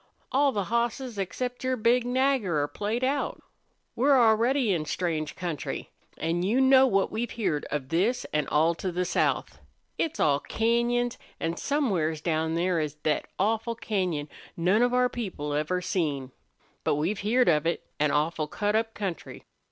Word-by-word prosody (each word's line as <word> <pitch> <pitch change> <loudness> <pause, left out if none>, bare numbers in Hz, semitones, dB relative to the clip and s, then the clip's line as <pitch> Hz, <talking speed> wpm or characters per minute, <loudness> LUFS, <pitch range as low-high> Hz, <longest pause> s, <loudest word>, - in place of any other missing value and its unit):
All 280 +1 +3
the 205 -5 -1
hosses 235 +1 -1
except 245 +7 -3
your 255 0 0
big 240 +2 +2
Nagger 250 - +1
are - - -1
played 215 +9 -3
out. 275 +2 0 0.6
We're 270 +2 +4
already 230 +1 +3
in 155 -3 -1
strange 155 -1 -2
country. 170 -5 -4 0.3
An' 165 +2 -1
you 210 +8 +2
know 265 0 +6
what 195 -5 +1
we've 230 +2 -2
heerd 185 -12 -1
of 135 -3 -4
this 195 +10 +1
an' 150 -2 +1
all 160 +3 +3
to 180 +2 -4
the 180 +1 -1
south. 180 - 0 0.4
It's 320 -1 -1
all 140 -2 +3
cañons, 235 +3 0 0.2
an' 165 +1 -2
somewheres 190 - 0
down 160 0 0
there 175 0 +1
is 150 -2 -2
thet 155 -1 0
awful 225 +3 0
cañon 180 -10 -2 0.3
none 185 +6 +3
of 245 0 +3
our 250 0 +3
people 185 -12 -4
ever 155 +5 0
seen. 145 -9 -1 0.5
But - - +2
we've 170 +8 -1
heerd 240 +5 +2
of 155 -1 +3
it. 170 - -1
An 150 0 +3
awful 155 +1 0
cut 205 +6 -1
up 225 0 0
country." 190 -6 -5
195 Hz, 165 wpm, -27 LUFS, 160-240 Hz, 0.6 s, know